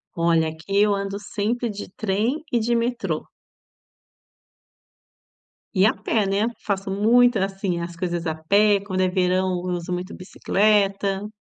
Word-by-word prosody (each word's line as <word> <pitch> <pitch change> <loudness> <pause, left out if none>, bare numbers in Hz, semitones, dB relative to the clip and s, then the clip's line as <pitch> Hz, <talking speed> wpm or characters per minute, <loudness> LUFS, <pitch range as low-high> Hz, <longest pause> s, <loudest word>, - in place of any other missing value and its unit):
Olha, 165 -1 +2
aqui 170 +6 -1
eu 210 -1 +3
ando 200 0 -3
sempre 220 +4 -2
de 205 -1 -7
trem 220 +10 -1
e 240 - +2
de 235 +2 0
metrô. 235 +1 -2 2.5
E 190 0 +4
a 220 - +4
pé, 220 -3 0
né? 195 +2 +1 0.2
Faço 195 -1 -2
muito, 230 +4 +4
assim, 195 -2 -2
as 170 0 -6
coisas 175 0 -3
a 160 -1 -1
pé. 200 +6 +3
Quando 185 -2 -2
é 185 - +3
verão 185 0 +1
eu 180 -1 -2
uso 175 0 -6
muito 180 +2 -5
bicicleta. 200 +1 +1
195 Hz, 145 wpm, -23 LUFS, 180-210 Hz, 2.5 s, E